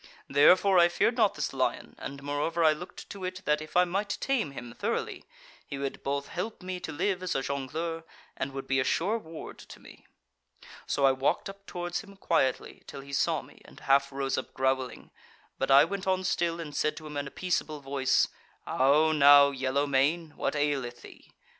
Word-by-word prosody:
Therefore 180 Hz, +7 st, +5 dB
I 170 Hz, -, +7 dB
feared 210 Hz, +7 st, +1 dB
not 220 Hz, -5 st, +3 dB
this 150 Hz, -, -3 dB
lion, 130 Hz, -1 st, -1 dB
and, 140 Hz, 0 st, -7 dB
moreover, 145 Hz, +4 st, -1 dB
I 155 Hz, -1 st, +6 dB
looked 175 Hz, +4 st, -10 dB
to 200 Hz, -2 st, -8 dB
it 185 Hz, 0 st, -5 dB
that 150 Hz, 0 st, +2 dB
if 155 Hz, +2 st, -4 dB
I 180 Hz, -, +6 dB
might 200 Hz, +3 st, -2 dB
tame 260 Hz, -, 0 dB
him 120 Hz, -4 st, -9 dB
thoroughly, -, -, -3 dB, 0.4 s
he 140 Hz, -, -7 dB
would 140 Hz, 0 st, -4 dB
both 140 Hz, 0 st, -3 dB
help 185 Hz, +2 st, -5 dB
me 185 Hz, 0 st, -4 dB
to 160 Hz, -, -6 dB
live 185 Hz, +5 st, -1 dB
as 185 Hz, -1 st, -2 dB
a 135 Hz, -, 0 dB
jongleur, 155 Hz, +5 st, -3 dB, 0.3 s
and 135 Hz, -, -3 dB
would 135 Hz, 0 st, -6 dB
be 135 Hz, 0 st, +1 dB
a -, -, +2 dB
sure 200 Hz, +12 st, 0 dB
ward 160 Hz, -5 st, -10 dB
to -, -, -12 dB
me. -, -, -16 dB, 0.8 s
"So 140 Hz, -, +1 dB
I 135 Hz, -, +6 dB
walked 135 Hz, +8 st, 0 dB
up 200 Hz, 0 st, -21 dB
towards 175 Hz, 0 st, -4 dB
him 200 Hz, -1 st, -14 dB
quietly, 165 Hz, -8 st, 0 dB
till 140 Hz, -, -8 dB
he 140 Hz, +1 st, -11 dB
saw 140 Hz, -, +1 dB
me -, -, -18 dB
and -, -, -15 dB
half 140 Hz, 0 st, +3 dB
rose 135 Hz, -1 st, -1 dB
up -, -, -10 dB
growling; 130 Hz, -1 st, -1 dB, 0.5 s
but 135 Hz, -, -1 dB
I 140 Hz, +2 st, +8 dB
went 190 Hz, +2 st, -5 dB
on 185 Hz, 0 st, +1 dB
still, 170 Hz, -2 st, 0 dB
and 150 Hz, -3 st, -7 dB
said 155 Hz, -, 0 dB
to 155 Hz, -, -9 dB
him 150 Hz, -1 st, -8 dB
in 145 Hz, -1 st, -2 dB
a -, -, -6 dB
peaceable 160 Hz, -3 st, -2 dB
voice: 135 Hz, -1 st, +1 dB, 0.4 s
'How 145 Hz, +4 st, +3 dB
now, 145 Hz, -1 st, +7 dB
yellow 135 Hz, +1 st, 0 dB
mane! 145 Hz, +4 st, +1 dB
what -, -, -2 dB
aileth 140 Hz, -5 st, -1 dB
thee? -, -, -15 dB
150 Hz, 205 wpm, -29 LUFS, 140-180 Hz, 0.8 s, I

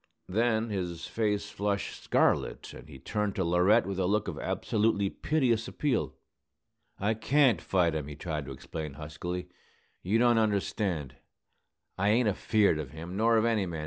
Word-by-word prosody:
Then 110 Hz, +2 st, +1 dB
his 90 Hz, -4 st, -3 dB
face 105 Hz, -2 st, -1 dB
flushed 100 Hz, -1 st, -2 dB
scarlet, -, -, +1 dB
and -, -, -12 dB
he -, -, -10 dB
turned 105 Hz, +9 st, -2 dB
to 95 Hz, -, 0 dB
Laurette 90 Hz, +7 st, +4 dB
with 95 Hz, -1 st, -3 dB
a 90 Hz, -, +1 dB
look 105 Hz, +2 st, +1 dB
of -, -, -4 dB
absolutely 105 Hz, -2 st, 0 dB
piteous 125 Hz, -8 st, 0 dB
appeal. 140 Hz, -5 st, -1 dB, 0.8 s
"I 105 Hz, +3 st, +1 dB
can't 130 Hz, +3 st, +3 dB
fight 90 Hz, -4 st, +1 dB
him," 75 Hz, -2 st, -3 dB
he 75 Hz, -, -7 dB
tried 75 Hz, -2 st, -4 dB
to 70 Hz, -, -7 dB
explain, 75 Hz, +3 st, -6 dB
huskily. 85 Hz, +5 st, -5 dB, 0.5 s
"You 100 Hz, +5 st, +1 dB
don't 120 Hz, -1 st, +4 dB
understand. 95 Hz, -, -1 dB, 0.8 s
I 100 Hz, +2 st, +2 dB
ain't 115 Hz, +2 st, +3 dB
afeard 105 Hz, -4 st, +2 dB
of 75 Hz, -4 st, -5 dB
him, 80 Hz, +5 st, -8 dB
nor 115 Hz, +2 st, +3 dB
of 110 Hz, -, +3 dB
any 110 Hz, -5 st, +1 dB
man. 85 Hz, -2 st, -5 dB
100 Hz, 165 wpm, -29 LUFS, 85-110 Hz, 0.8 s, Laurette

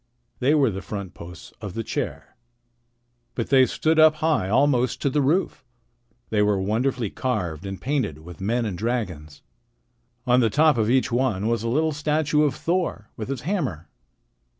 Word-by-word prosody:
They 135 Hz, +4 st, +3 dB
were 135 Hz, -6 st, +3 dB
the 95 Hz, 0 st, -5 dB
front 100 Hz, -4 st, -6 dB
posts 85 Hz, 0 st, -11 dB
of 100 Hz, -4 st, -6 dB
the 115 Hz, -, -2 dB
chair. -, -, -5 dB, 1.0 s
But 115 Hz, +1 st, -3 dB
they 130 Hz, -2 st, +6 dB
stood 160 Hz, 0 st, +1 dB
up 155 Hz, 0 st, +7 dB
high, 155 Hz, -, 0 dB
almost 130 Hz, +1 st, +2 dB
to 140 Hz, -, +1 dB
the 145 Hz, -, +2 dB
roof. 155 Hz, +2 st, 0 dB, 0.7 s
They 105 Hz, -1 st, +2 dB
were 105 Hz, -1 st, +2 dB
wonderfully 115 Hz, +3 st, -1 dB
carved 90 Hz, -, -3 dB
and 95 Hz, -1 st, -6 dB
painted 130 Hz, -, -1 dB
with 90 Hz, +1 st, -11 dB
men 115 Hz, +4 st, 0 dB
and 100 Hz, -4 st, -3 dB
dragons. 90 Hz, -9 st, -4 dB, 0.8 s
On 125 Hz, -1 st, +4 dB
the 115 Hz, -3 st, +3 dB
top 155 Hz, +5 st, +4 dB
of 110 Hz, 0 st, +1 dB
each 130 Hz, +1 st, +2 dB
one 120 Hz, -5 st, 0 dB
was 115 Hz, -1 st, 0 dB
a 115 Hz, -, -2 dB
little 155 Hz, +6 st, +1 dB
statue 150 Hz, 0 st, +1 dB
of 150 Hz, -2 st, +2 dB
Thor 170 Hz, -, -2 dB
with 110 Hz, +2 st, -6 dB
his 135 Hz, -3 st, -3 dB
hammer. 130 Hz, -, -3 dB
120 Hz, 175 wpm, -24 LUFS, 100-145 Hz, 1.0 s, up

